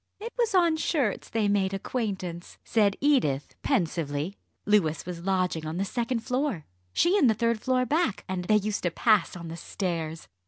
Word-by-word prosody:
"It 455 +3 -6
was 465 -4 +1
on 340 -3 +4
shirts 280 - 0
they 220 -2 +1
made 195 -1 +1
acquaintance," 190 -6 -4
said 205 -3 +2
Edith 245 - +2
pensively. 165 - -1 0.3
"Louis 180 -8 +2
was 170 -1 -6
lodging 180 -4 0
on 160 +2 -4
the 195 - 0
second 235 +3 -1
floor, 250 - -1 0.3
she 360 - +3
in 275 - +5
the 220 - +3
third 230 +1 +1
floor 255 -1 +1
back, 305 - 0
and 185 -1 -3
they 215 - +4
used 210 0 0
to 175 - +1
pass 215 +4 +2
on 170 -2 -7
the 165 +1 -6
stairs. 165 -4 -4
205 Hz, 180 wpm, -27 LUFS, 175-255 Hz, 0.3 s, in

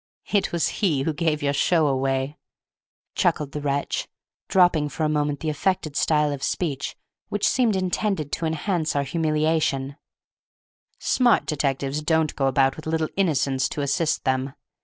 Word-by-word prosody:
It 205 - +2
was 170 -1 +1
he 155 -10 +2
who 160 - -1
gave 155 -2 0
your 140 0 +1
show 160 +3 +3
away," 135 +1 -1 0.7
chuckled 145 -2 0
the 150 - -5
wretch, 140 0 -1 0.4
dropping 175 -5 +3
for 155 - -4
a - - +3
moment 145 -1 0
the 160 - -1
affected 155 -1 -1
style 150 -1 +2
of 140 -2 -5
speech 140 -5 -2 0.3
which 205 - +1
seemed 240 -5 +2
intended 185 -4 -1
to 165 - -1
enhance 160 0 -1
our 140 - +2
humiliation; 155 -2 0 1.0
"smart 245 -3 +3
detectives 140 -1 -1
don't 160 -1 +1
go 135 - +1
about 135 0 +2
with 155 - -9
little 160 -1 0
innocents 140 -8 +1
to 145 - -4
assist 140 +3 0
them. 130 +1 -1
150 Hz, 155 wpm, -24 LUFS, 140-165 Hz, 1.0 s, show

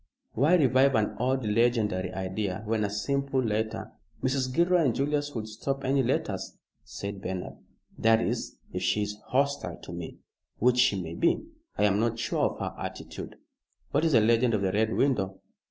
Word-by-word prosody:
"Why 150 +9 +4
revive 135 -3 +4
an 105 -1 +1
old 130 0 0
legendary 105 -4 +1
idea 95 +1 -3
when 110 0 0
a 100 - 0
simple 140 +6 -1
letter 110 -2 -1 0.2
" - - -31
"Mrs. 130 0 0
Gilroy 170 +3 +3
and 125 - +2
Julius 145 0 -1
would 110 -1 -3
stop 135 +6 -3
any 135 +1 +2
letters," 125 - -2 0.3
said 100 -1 -6
Bernard, 90 -1 -5 0.4
"that 115 0 +5
is, - - -2 0.2
if - - -2
she 105 - +1
is 105 0 -5
hostile 140 +2 0
to - - -8
me, - - -7 0.4
which 125 +1 +3
she 125 -6 +4
may 85 -2 -5
be. 170 - +1 0.3
I - - +2
am 100 -1 +3
not 115 0 +1
sure - - 0
of - - -9
her - - -4
attitude." - - -7 0.6
"What 145 +2 +2
is 160 -2 +2
the 115 - +6
legend 115 +1 +3
of 100 - -1
the 95 - +1
Red 110 +3 +1
Window?" 100 -8 +1
115 Hz, 185 wpm, -28 LUFS, 105-135 Hz, 0.6 s, the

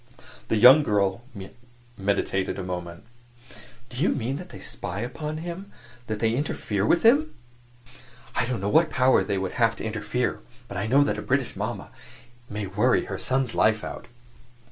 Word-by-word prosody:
The - - +1
young 125 +7 +9
girl 100 -5 +1 0.7
meditated 95 -1 -1
a 95 - -4
moment. 90 0 -6 0.9
"Do 125 +2 -5
you 180 - +3
mean 130 +2 -1
that 180 +2 -9
they - - -10
spy 90 +3 -5
upon 150 +6 -4
him 175 +4 -7 0.4
that 110 - -2
they 115 0 +2
interfere 110 -6 -1
with 170 - +3
him?" 285 +7 +4 1.0
"I 115 +1 0
don't 125 -5 -2
know 100 - -1
what 160 +9 +4
power 130 -3 +3
they 100 -2 -1
have 115 +4 +1
to - - -8
interfere, 110 +2 -2 0.3
but 100 - -8
I 100 +3 -2
know 135 +5 +5
that 145 - -1
a - - -4
British - - -1
mama - - -4 0.6
may 105 -2 -4
worry 105 +7 +2
her - - -5
son's 130 -2 0
life 110 0 +2
out." - - -7
115 Hz, 165 wpm, -25 LUFS, 100-140 Hz, 1.0 s, young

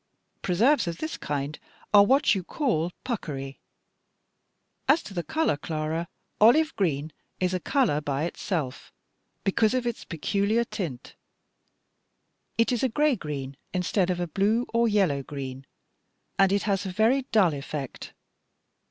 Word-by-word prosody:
Preserves 220 +7 +3
of 170 -1 -3
this 315 - -4
kind 145 +1 -3 0.3
are 205 -1 +9
what 270 +7 +4
you 190 -3 -2
call 180 - 0
'puckery.' 140 - -4 1.3
As 295 +5 +4
to 200 - -9
the 175 - -1
color, 315 - 0
Clara, 160 +1 -3 0.3
'olive 305 +9 +5
green' 155 -5 -1 0.3
is 185 0 +1
a 185 - 0
color 230 - +1
by 145 0 -1
itself, 165 -5 -3 0.5
because 215 +4 +2
of 255 -1 0
its 240 -2 -3
peculiar 200 +6 0
tint. 180 - -6 1.4
It 230 +1 +3
is 245 - 0
a 265 - +2
gray 295 +3 +2
green 140 - -5 0.2
instead 185 +1 +1
of 180 -1 0
a 175 - 0
blue 210 +8 +1
or 235 0 +3
yellow 190 -10 +2
green, 135 -1 -7 0.7
and 195 -1 +5
it 200 0 +1
has 200 -2 0
a - - -3
very 235 +7 +2
dull 195 -8 +4
effect. 140 -1 -6
185 Hz, 145 wpm, -27 LUFS, 150-230 Hz, 1.4 s, are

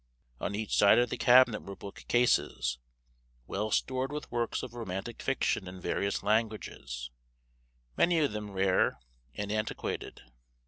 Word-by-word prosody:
On 100 - -2
each 110 0 -2
side 100 - +6
of 120 -1 +2
the - - 0
cabinet 125 -3 +6
were 100 - -8
book 100 - -10
cases, 65 - +2 0.7
well 105 - -2
stored 130 +4 0
with 150 0 -6
works 120 -1 -1
of 125 -3 -7
romantic 115 -1 -5
fiction 130 -7 0
in 90 0 -8
various 100 +2 -1
languages, 105 - -2 0.8
many 170 -1 +3
of 150 -6 +2
them 105 0 -5
rare 95 -1 +2 0.4
and 100 0 -3
antiquated. 110 0 -3
110 Hz, 140 wpm, -30 LUFS, 100-120 Hz, 0.8 s, side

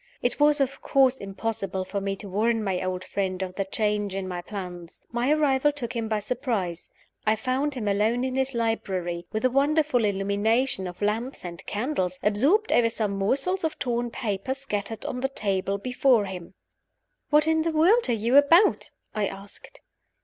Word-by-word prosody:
It 245 +3 0
was, 295 0 +4
of 275 -1 -1
course, 265 -1 +3
impossible 195 -2 -3
for 200 +1 -3
me 195 0 -2
to 200 +1 -10
warn 220 +4 +1
my 190 -3 -1
old 185 0 -3
friend 190 -2 -2
of 185 -1 -5
the 195 +1 -2
change 210 -1 -1
in 195 -1 -3
my 180 -1 -4
plans. 180 -3 -8
My 240 +4 +1
arrival 295 -2 +3
took 260 -5 -4
him 230 -1 -2
by 220 -1 0
surprise. 205 -6 -3 0.4
I 215 - +4
found 260 +6 -1
him 225 -5 -3
alone 215 +5 +1
in 260 0 -2
his 265 -1 -1
library, 185 -7 -2
with 220 +3 -1
a 255 - +3
wonderful 285 -2 +2
illumination 205 +2 +1
of 180 +3 -7
lamps 225 +3 -2
and 170 0 -7
candles, 205 -6 -1
absorbed 280 - +3
over 235 -1 +4
some 220 -3 -2
morsels 270 - 0
of 320 -1 -1
torn 240 -1 -1
paper 230 +1 -3
scattered 220 -5 -4
on 250 - -3
the 270 +1 0
table 195 -5 -1
before 250 0 +2
him. 185 -1 -8 0.7
"What 300 0 +4
in 320 0 +3
the 330 +1 0
world 350 - +4
are - - +3
you 230 +4 +3
about?" 330 +8 +5 0.2
I 210 -2 0
asked. 195 +1 -10
225 Hz, 180 wpm, -26 LUFS, 195-265 Hz, 0.7 s, about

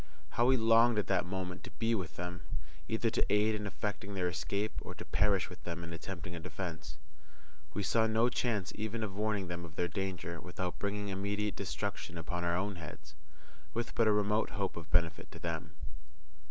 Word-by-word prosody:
How 120 - +4
we 130 0 +6
longed 115 0 +6
at 105 - +3
that 95 -2 +3
moment 90 -1 -3
to - - -6
be 115 0 +2
with 85 -8 -1
them! 90 0 -4 0.5
either 110 0 +1
to - - +2
aid 105 +1 +5
in 105 -1 -2
effecting 100 0 -3
their 90 -2 +2
escape, 100 +6 0
or 90 - -7
to 110 - -7
perish 100 -3 +3
with 90 - -11
them 85 0 -4
in 85 0 -5
attempting 85 0 -5
a - - -4
defence. 80 -4 -5 0.8
We 105 - 0
saw 110 +3 +4
no 110 +2 +4
chance 115 -6 +1
even 110 +1 -2
of 100 -3 -3
warning 105 -2 +1
them 85 0 -3
of 80 -2 -9
their 90 - +1
danger 90 -1 -3
without 90 0 -3
bringing 100 0 -1
immediate 100 +2 0
destruction 85 - -3
upon 85 +2 -2
our 85 0 +2
own 95 0 -1
heads, 75 -2 -8 0.6
with 120 0 -1
but 115 - +4
a - - +7
remote 105 +1 +3
hope 100 -2 -1
of 85 -3 -7
benefit 80 -2 +2
to - - -8
them. 80 -2 -2
95 Hz, 195 wpm, -34 LUFS, 85-105 Hz, 0.8 s, a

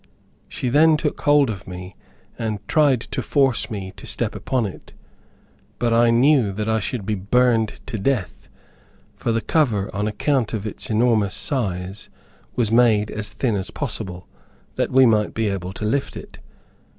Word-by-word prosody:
She 125 - -3
then 155 +4 +5
took 150 -1 -3
hold 145 -4 +4
of 100 -1 -8
me, 90 +1 -8 0.4
and 110 -3 -4
tried 145 -6 +3
to - - -4
force 135 -6 +2
me 95 -4 -6
to - - -10
step - - -1
upon 130 -4 -1
it, 95 - -9 0.8
but 120 -1 +1
I 120 0 +4
knew 120 -4 +3
I 110 +1 0
should 110 0 -4
be 110 - -1
burned 110 +2 +1
to 110 - -5
death, 110 -3 -2 0.7
for 115 - -2
the 115 0 0
cover, 110 -7 0
on 105 +1 -1
account 115 +3 0
of 105 -1 -4
its 105 - -5
enormous 110 -3 +2
size 95 -7 -3 0.5
was 115 -3 +1
made 110 -3 +4
as 105 -1 -4
thin 115 0 -1
as 95 -1 -3
possible, 95 -9 -5 0.5
that - - 0
we 130 0 +5
might 110 -3 +2
be 110 -2 0
able 95 -2 -4
to 110 - -5
lift 135 +6 -1
it. - - -11
110 Hz, 165 wpm, -22 LUFS, 100-125 Hz, 0.8 s, then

